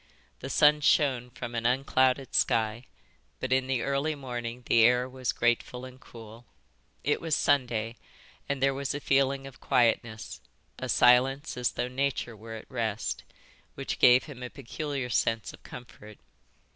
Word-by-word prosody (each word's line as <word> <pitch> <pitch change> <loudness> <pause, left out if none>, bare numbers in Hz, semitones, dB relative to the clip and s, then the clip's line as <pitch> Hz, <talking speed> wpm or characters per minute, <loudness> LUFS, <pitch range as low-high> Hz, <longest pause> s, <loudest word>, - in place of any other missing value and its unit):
The - - -6
sun 150 0 +4
shone 130 -4 +2
from 120 -1 -7
an 115 0 0
unclouded 130 0 +1
sky, 115 +2 +1 0.5
but 130 - -4
in 130 0 +1
the 130 -3 0
early 140 +3 0
morning 120 -3 -6
the 115 0 +4
air 125 +2 +4
was 130 -1 -3
grateful 120 +1 -1
and 130 0 -12
cool. 115 +1 -13 0.6
It 145 - 0
was 160 -2 0
Sunday, 120 -6 0 0.5
and 140 -1 -1
there 135 0 +3
was 140 +1 -3
a - - -3
feeling 135 -1 +1
of 135 -2 -12
quietness, 115 -2 0 0.4
a - - -5
silence 135 +4 +4
as 125 -1 -1
though 125 - -2
nature 125 -2 -2
were 110 +1 -9
at 110 - -9
rest, 115 -4 -2 0.5
which - - -4
gave 125 +1 +6
him 140 -5 -11
a 125 - -5
peculiar 140 0 -5
sense 115 0 0
of - - -15
comfort. 110 -3 -12
125 Hz, 160 wpm, -28 LUFS, 120-135 Hz, 0.6 s, gave